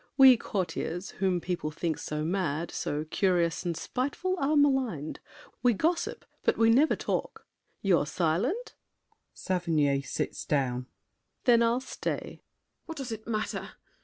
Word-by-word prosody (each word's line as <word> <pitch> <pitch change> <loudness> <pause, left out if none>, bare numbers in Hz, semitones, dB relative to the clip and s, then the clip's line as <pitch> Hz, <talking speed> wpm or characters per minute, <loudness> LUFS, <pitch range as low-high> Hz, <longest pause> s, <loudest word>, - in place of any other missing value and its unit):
We 265 -2 +9
courtiers, 180 -4 -3
Whom 190 -2 +2
people 175 -3 -2
think 160 0 -2
so 150 0 -3
mad, 170 -2 -1
so 150 +1 -2
curious 175 0 +1
And 170 -3 -2
spiteful, 285 +9 -2
are 285 +2 +2
maligned. 260 - +1 0.4
We 245 -1 +4
gossip, 335 - -1 0.2
but - - +2
We 225 0 +5
never 280 +7 +5
talk! - - -3 0.4
You're 175 -7 +3
silent? 195 - 0 0.6
[Sits 155 -7 0
down.] 130 -3 0 0.6
Then 235 -2 +5
I'll 235 +2 +2
stay! 260 - -3
MARION. - - -11 0.5
What 325 -1 -6
does 265 -4 -5
it 220 0 -6
matter? 215 -2 -3
190 Hz, 135 wpm, -29 LUFS, 160-250 Hz, 0.6 s, We